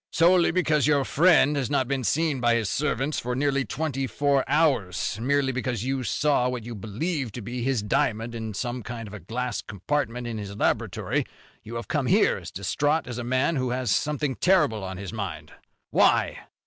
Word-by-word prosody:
"Solely 170 +1 +4
because 155 -5 +2
your 145 -3 +3
friend 160 -2 +4
has 135 -3 -1
not 135 -3 +1
been 135 -1 -1
seen 155 +2 +1
by 120 -1 +3
his 110 -6 0
servants 140 - -1
for 125 +1 -3
nearly 140 0 +1
twenty 135 +1 -2
four 140 +3 +1
hours, 130 - +1
merely 140 +1 +2
because 125 -3 -2
you 135 0 -1
saw 125 +2 +1
what 125 -2 -4
you 120 +1 -7
believe 115 - -3
to 120 - -6
be 120 +3 -5
his 125 -3 0
diamond 115 +2 0
in 110 -2 -5
some 120 +3 -3
kind 115 -1 -6
of 100 - -11
a 105 - -7
glass 120 +6 -3
compartment 120 +3 -2
in 115 -2 -4
his 100 -1 -6
laboratory, - - 0 0.4
you 115 +2 -6
come 145 -4 0
here - - +4
as - - -8
distraught 145 - 0
as 125 -1 -5
a - - -3
man 130 +6 +1
who 130 -1 0
has 125 -3 -1
something 150 0 0
terrible 175 - +2
on 95 -1 -5
his 95 -1 -7
mind. - - -5 0.4
Why?" - - +2
130 Hz, 190 wpm, -26 LUFS, 115-145 Hz, 0.4 s, Solely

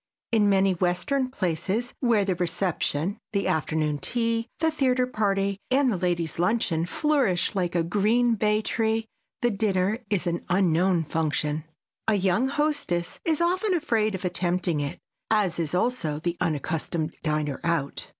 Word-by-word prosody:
In 215 -3 +4
many 195 0 +4
western 185 - 0
places 190 +2 -2
where 230 -6 +3
the 190 - +1
reception, 180 +1 -1
the 200 -1 0
afternoon 155 -1 0
tea, 230 - 0
the 320 0 +2
theater 255 -4 +2
party 200 -4 0
and 260 0 +3
the - - 0
ladies' 175 -3 -1
luncheon 175 -3 +1
flourish 270 - +1
like 180 -3 -1
a 170 - +3
green 215 +7 +2
bay 215 0 +1
tree, 225 0 0 0.4
the 240 - +3
dinner 200 0 +1
is 200 -4 0
an 170 -1 -1
unknown 180 -1 +3
function. 155 -1 -1 0.4
A 220 - +4
young 195 +6 +2
hostess 285 - -1
is 320 -1 +1
often 370 +3 +2
afraid 225 - +1
of 190 - -6
attempting 175 -2 0
it, 140 -1 -3 0.3
as 200 -6 +1
is 165 0 -1
also 180 -8 0
the 170 +2 -2
unaccustomed 160 +1 -1
diner 150 -3 -1
out. 165 -4 -1
190 Hz, 150 wpm, -26 LUFS, 170-230 Hz, 0.4 s, In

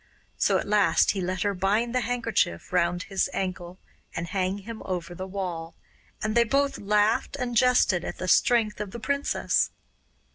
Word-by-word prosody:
So - - +2
at - - -3
last 205 -1 +4
he 195 - -3
let 185 +1 -2
her 205 -1 +1
bind 205 +6 0
the 255 - +1
handkerchief 230 - -1
round 175 0 +1
his 195 -2 -1
ankle 185 -1 -4 0.4
and 170 - -2
hang 185 +2 -1
him 220 +3 -8
over 175 -2 -4
the 185 +2 -6
wall, 180 -4 -5 0.5
and 215 0 0
they 235 +1 +5
both 275 +5 0
laughed 210 +5 +1
and 245 -2 -2
jested 230 -7 +4
at - - -5
the 185 - -4
strength 220 +1 +3
of 210 - -4
the 235 - -8
princess. 280 +4 0
200 Hz, 175 wpm, -26 LUFS, 185-230 Hz, 0.5 s, they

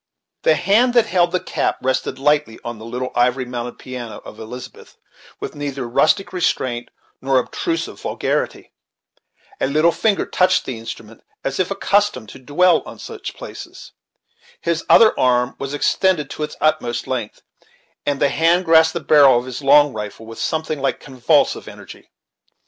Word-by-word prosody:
The 155 - +4
hand 215 +8 +2
that 235 - +5
held 175 -1 +2
the 185 - +1
cap - - -2
rested 130 0 -1
lightly 145 -4 +1
on 120 -2 -6
the 110 - -10
little 125 +2 -4
ivory 125 +1 +1
mounted 120 -1 -6
piano 125 -3 -7
of 105 - -11
Elizabeth, 120 +3 -10 0.4
with - - -6
neither 140 -3 -4
rustic 155 +12 +2
restraint 130 -9 -1 0.3
nor 135 0 +2
obtrusive 330 - -2
vulgarity. - - -3 0.9
A - - +1
single 155 +4 +3
finger 205 +3 +1
touched 185 0 +2
the 125 -4 -5
instrument, 115 0 -10 0.2
as 135 +4 -3
if 185 - +1
accustomed 195 - 0
to - - -11
dwell 165 +7 +3
on - - -10
such - - -8
places. - - -10 0.7
His 170 -1 -1
other 225 -1 +7
arm 125 -1 +2
was 140 +1 -4
extended 160 -1 +1
to - - -7
its 150 0 -3
utmost 150 -7 0
length, 120 -5 -4 0.6
and 145 -1 -1
the 140 - +3
hand 170 +5 +2
grasped 160 -1 +5
the 170 - -3
barrel 140 -4 +6
of 120 - -2
his 130 +1 -6
long 145 0 +5
rifle 105 +1 -7
with 115 0 -10
something 155 -2 -2
like 135 - -1
convulsive 130 -3 +1
energy. - - -12
140 Hz, 160 wpm, -20 LUFS, 125-170 Hz, 0.9 s, other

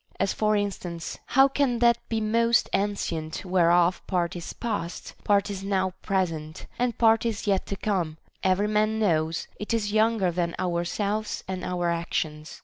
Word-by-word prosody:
As 195 - +1
for 215 0 +1
in 205 -1 +1
stance, 170 -3 -7
how 270 +1 +6
can 270 -3 +1
that 235 0 +4
be 225 - 0
most 230 +2 +2
ancient 170 -5 -2
whereof 175 -1 +3
part 175 -2 0
is 175 - -6
past, 200 -7 -4
part 205 0 +2
is 195 -1 -5
now 190 -1 0
present, 165 -5 -2
and 245 -2 0
part 225 -1 +4
is 225 -3 -2
yet 195 -2 +1
to 200 - -3
come; 180 -7 -1 0.2
every 190 +2 +2
man 215 +1 +1
knows 165 -6 +1
it 210 +2 -1
is 205 -2 -1
younger 215 -4 +3
than 170 -1 -1
ourselves 200 +5 -2
and 185 -1 -4
our 175 -1 -1
actions. 155 -2 -3
195 Hz, 165 wpm, -26 LUFS, 170-215 Hz, 0.2 s, how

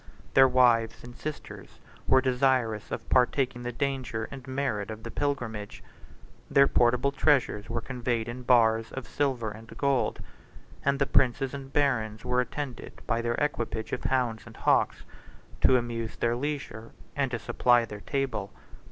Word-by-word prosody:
Their 135 0 +7
wives 120 -3 +3
and 120 0 -10
sisters 155 -1 -8 0.3
were 130 0 +5
desirous 125 -4 +1
of - - -5
partaking 130 0 +2
the 120 0 -4
danger 125 -3 -2
and 135 -2 -9
merit 130 -7 -2
of 110 0 -7
the 115 - -6
pilgrimage: 120 -8 -3 0.7
their 140 - +6
portable 125 +3 +3
treasures 135 -8 +1
were 115 0 -2
conveyed 120 -3 -2
in 120 +2 -6
bars 115 -2 +3
of 130 - -6
silver 130 -7 -1
and 110 +2 -11
gold; 140 -3 +1 0.6
and 140 0 +2
the 140 - +2
princes 130 0 +2
and 135 -1 -7
barons 115 -7 0
were 125 0 +2
attended 125 0 -6
by 115 0 0
their 120 0 -1
equipage 115 -6 -2
of - - -3
hounds 125 -4 0
and - - -13
hawks - - +2 0.6
to 130 - +6
amuse 115 -2 -3
their 120 0 0
leisure 140 -4 -5 0.2
and 140 -2 0
to 120 - -2
supply 120 +1 +3
their 105 -2 -9
table. 135 -6 -2
125 Hz, 155 wpm, -28 LUFS, 115-135 Hz, 0.7 s, Their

